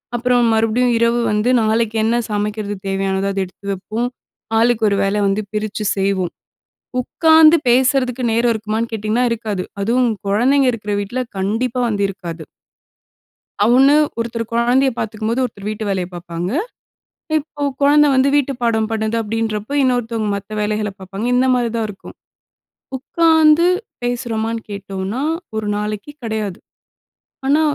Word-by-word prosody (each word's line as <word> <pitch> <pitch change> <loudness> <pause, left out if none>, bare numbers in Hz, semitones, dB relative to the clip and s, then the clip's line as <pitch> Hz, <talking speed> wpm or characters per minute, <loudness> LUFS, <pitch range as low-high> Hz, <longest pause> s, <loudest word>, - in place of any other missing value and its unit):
அப்புறம் 245 0 +2
மறுபடியும் 230 +2 +2
இரவு 235 +1 +2
வந்து 210 +4 +1
நாளைக்கு 220 0 +1
என்ன 230 +1 +2 0.2
சமைக்கிறது 205 0 -2
தேவையானதோ 195 0 -1
அத 195 - -2
எடுத்து 200 +2 -7
வப்போம். 220 +6 -3 0.5
ஆளுக்கு 230 -1 +2
ஒரு 200 - +1
வேலை 200 +1 0
வந்து 200 +2 0
பிரிச்சு 210 0 -3
செய்வோம். 195 -3 0 0.7
"உட்காந்து 320 +4 +5
பேசுறதுக்கு 255 0 +2
நேரம் 235 +1 +2
இருக்குமான்னு?" 220 +1 -3
கேட்டிங்கன்னா, 220 +3 0
இருக்காது. 215 -5 -2 0.2
அதுவும் 240 +3 +2 0.2
குழந்தைங்க 255 +6 +3
இருக்கிற 210 -3 -4
வீட்ல 240 +6 -3 0.2
கண்டிப்பா 225 +6 -1
வந்து 205 -3 -1
இருக்காது. 170 -4 -7 1.2
அவனு 265 +5 +5 0.2
ஒருத்தர் 230 -1 -3
கொழந்தையை 250 +3 +3
பாத்துக்கும்போது, 220 +3 -1
ஒருத்தர் 205 -3 -8
வீட்டு 215 0 -4
வேலையை 185 -2 -1
பாப்பாங்க. 175 +2 -5 0.9
இப்ப 290 -1 -5 0.2
கொழந்த 295 +1 +5
வந்து 260 +1 +4
வீட்டு 280 -1 +2
பாடம் 220 -1 +1
பண்ணுது 220 0 -1
அப்படின்றப்போ, 220 +2 -3
இன்னொருத்தங்க 230 -4 0
மத்த 200 +2 -8
வேலைகள 210 0 -1
பாப்பாங்க. 195 +3 -6
இந்த 255 +1 +3
மாரி 245 -2 +1
தான் 225 -1 0
இருக்கும். 195 - -11 0.8
உக்காந்து 320 +3 +4 0.4
பேசுறோமான்னு 230 -2 -2
கேட்டோம்னா, 200 +4 -4 0.3
ஒரு 220 -1 -2
நாளைக்கு 210 +5 -4
கிடையாது. 215 -4 -3 0.9
ஆனா, 295 +3 +4
225 Hz, 130 wpm, -18 LUFS, 205-250 Hz, 1.2 s, உட்காந்து